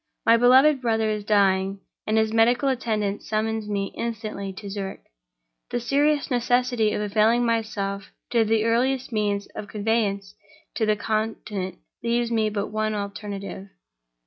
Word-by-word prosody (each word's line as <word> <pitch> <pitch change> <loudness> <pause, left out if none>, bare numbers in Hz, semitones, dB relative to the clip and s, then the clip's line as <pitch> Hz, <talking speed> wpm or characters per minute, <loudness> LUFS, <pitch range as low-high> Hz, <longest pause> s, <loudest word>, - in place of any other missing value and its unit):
My 230 - +7
beloved 260 +4 +5
brother 225 -2 +1
is 210 -1 -3
dying 195 -2 +2 0.3
and 215 +1 +2
his 220 0 +2
medical 240 +4 +3
attendant 215 -5 -1
summons 220 0 -2
me 200 -1 -2
instantly 215 -4 -4
to 200 +2 -9
Zurich. 195 -1 -5 0.7
The 240 - -1
serious 285 +4 +1
necessity 245 -2 +2
of - - -1
availing 215 +3 +2
myself 215 -4 -2 0.2
of 230 -2 +3
the 220 0 +2
earliest 250 +3 +1
means 205 -2 0
of 205 - -7
conveyance 205 -2 -1 0.4
to 220 - 0
the 215 - +3
Continent 210 -3 -3 0.3
leaves 235 0 0
me 220 -2 +2
but 205 -1 -3
one 215 0 -1
alternative. 200 -1 -6
215 Hz, 145 wpm, -24 LUFS, 205-235 Hz, 0.7 s, My